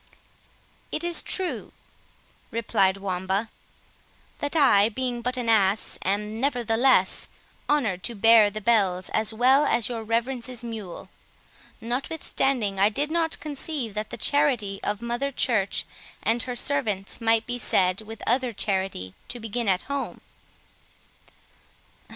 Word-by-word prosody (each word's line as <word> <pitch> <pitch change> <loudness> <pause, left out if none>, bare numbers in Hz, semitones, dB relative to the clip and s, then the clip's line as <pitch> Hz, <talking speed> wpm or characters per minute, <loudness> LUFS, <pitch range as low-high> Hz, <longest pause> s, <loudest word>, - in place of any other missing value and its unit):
"It 310 - -3
is 345 -1 0
true," 375 -2 -2 0.8
replied 195 -4 +1
Wamba, 195 +2 -2 0.9
"that 290 +2 -3
I, 220 -9 +5
being 245 +1 -3
but 250 +2 -2
an 245 -2 -3
ass, 210 -2 +2
am, 210 +3 -1
nevertheless, 245 -5 +2 0.4
honoured 225 -12 +1
to 235 - -3
hear 225 0 +7
the 215 +1 -6
bells 195 -5 +2
as 220 0 0
well 255 +6 +4
as 235 -6 +1
your 235 -2 -3
reverence's 235 +2 -2
mule; 220 -6 -7 0.7
notwithstanding, 245 - -1
I 200 +2 +5
did 290 +8 -2 0.3
conceive 290 -5 -4
that 215 +1 -4
the 240 - -6
charity 245 -8 +1
of 210 +2 -2
Mother 240 +4 -2
Church 225 -7 +1 0.4
and 230 +2 +2
her 250 0 -3
servants 235 -8 -2
might 225 0 +3
be 245 0 -4
said, 185 -3 +2
with 220 0 -10
other 250 0 +1
charity, 190 - -2
to 245 - -4
begin 225 +1 -3
at 185 -1 +1
home." 280 0 -4
230 Hz, 125 wpm, -25 LUFS, 205-255 Hz, 0.9 s, hear